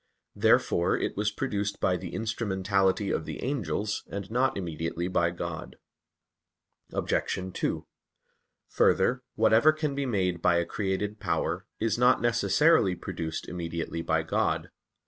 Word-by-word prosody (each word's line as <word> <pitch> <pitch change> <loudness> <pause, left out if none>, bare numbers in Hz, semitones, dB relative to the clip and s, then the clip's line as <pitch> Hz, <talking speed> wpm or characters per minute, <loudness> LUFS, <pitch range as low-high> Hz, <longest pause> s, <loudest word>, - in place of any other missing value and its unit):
Therefore 85 +1 +3
it - - -2
was 105 +1 +1
produced 105 -3 -2
by 90 - +2
the 90 -1 -6
instrumentality 100 -3 0
of 80 - -1
the - - -6
angels, 105 - -2
and 100 0 -6
not 125 +1 +1
immediately 85 -1 -3
by 85 -2 +2
God. 85 -1 -6 1.2
Obj. - - -1 0.2
2: - - -2 0.8
Further, - - +3
whatever 115 +8 +5
can 155 -2 -2
be 140 -1 -2
made 90 -7 0
by 85 - +4
a 85 0 +2
created 100 +2 -2
power, - - -1
is 115 0 0
not 125 +1 +5
necessarily 115 - +3
produced 80 -1 -5
immediately 85 -1 -4
by - - +1
God. - - -1
100 Hz, 130 wpm, -28 LUFS, 85-115 Hz, 1.2 s, whatever